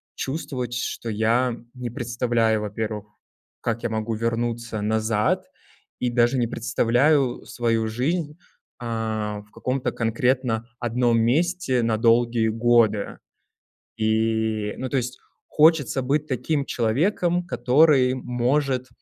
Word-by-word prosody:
чувствовать, 130 -4 -4
что 120 -1 -3
я 115 +3 +1 0.2
не 125 -2 -5
представляю, 120 -2 0
во-первых, 105 0 -4 0.5
как 115 -1 -2
я 120 - -2
могу 110 +1 -2
вернуться 115 0 -2
назад 110 0 0 0.5
и 125 -1 0
даже 120 +2 +2
не 120 - +2
представляю 125 +4 +1
свою 115 -2 0
жизнь, 150 +7 -2 0.4
э, 120 - -6
в 110 -2 -3
каком-то 130 0 -2
конкретно 120 0 0
одном 120 -1 +1
месте 140 +2 +1
на 115 -1 +1
долгие 115 0 +3
годы. 115 -2 +2 0.8
И 110 -1 0
ну, 130 - -3
то 140 - -1
есть 125 0 -3 0.3
хочется 150 -4 +3
быть 145 +4 0
таким 140 +2 -1
человеком, 170 - 0
который 130 0 +4
может, 130 +1 0
120 Hz, 115 wpm, -24 LUFS, 110-130 Hz, 0.8 s, который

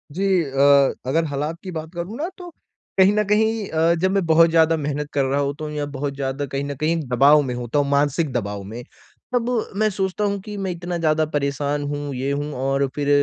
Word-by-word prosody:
जी 195 - 0 0.2
अ, 140 0 +4 0.2
अगर 165 +4 +2
हलात 150 +4 -3
की 185 - -6
बात 160 -1 -5
करूँ 175 +6 -5
ना 320 +4 -2
तो 355 -1 -9 0.5
कहीं 190 +1 +6
न 210 0 +2
कहीं 220 0 +1
अ, 165 +1 +2
जब 190 0 +2
मैं 195 -2 +1
बहुत 165 +1 +5
ज़्यादा 165 0 +4
मेहनत 145 0 -3
कर 140 - +2
रहा 135 +2 0
हूँ 140 0 0
तो 155 - -4
या 150 -1 -3
बहुत 140 +1 -3
ज़्यादा 135 +1 -3
कहीं 140 0 -2
न 140 0 -4
कहीं 155 +4 0
एक 155 -5 -5
दबाव 140 +4 +6
में 130 -3 -3
हूँ 120 0 -5
तो 145 -1 +3
मानसिक 140 +1 +1
दबाव 100 -4 -3
में। 110 +5 -8 0.5
तब 245 -1 +1 0.3
मैं 215 +1 +2
सोचता 190 0 -2
हूँ 200 -1 0
कि 210 +2 -8
मैं 190 -2 -2
इतना 175 0 -4
ज़्यादा 155 -1 +2
परेशान 145 0 -1
हूँ 145 0 -4
ये 130 +2 -2
हूँ 145 +1 -3
और 135 +1 0
फिर 145 -1 -1
150 Hz, 225 wpm, -22 LUFS, 140-175 Hz, 0.5 s, कहीं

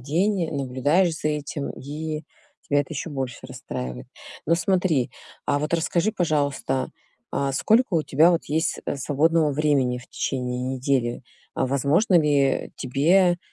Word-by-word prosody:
день, 170 - 0
наблюдаешь 145 +6 +1
за 155 - -1
этим, 150 -1 -3
и 155 +2 -5 0.5
тя 145 - +2
это 145 +2 0
ещё 150 - -4
больше 130 -4 -4
расстраивает. 65 - -6 0.4
Ну 165 - +4
смотри, 170 -7 +1 0.4
а 145 - +2
вот 150 +2 -3
расскажи, 170 +5 +1
пожалуйста, 145 -7 0 0.5
а 140 0 0
сколько 225 - +3
вот 165 - +3
у - - -4
тебя 160 +5 +5
вот 170 - 0
есть, 160 +2 0
э, - - -1
свободного 155 +3 +2
времени 140 -4 +1
в 125 - -14
течение 125 -1 -3
недели? 125 -2 0 0.3
А - - 0
возможно 145 - +2
ли 145 -3 +2
тебе, 175 +8 +3
145 Hz, 145 wpm, -24 LUFS, 135-165 Hz, 0.5 s, тебя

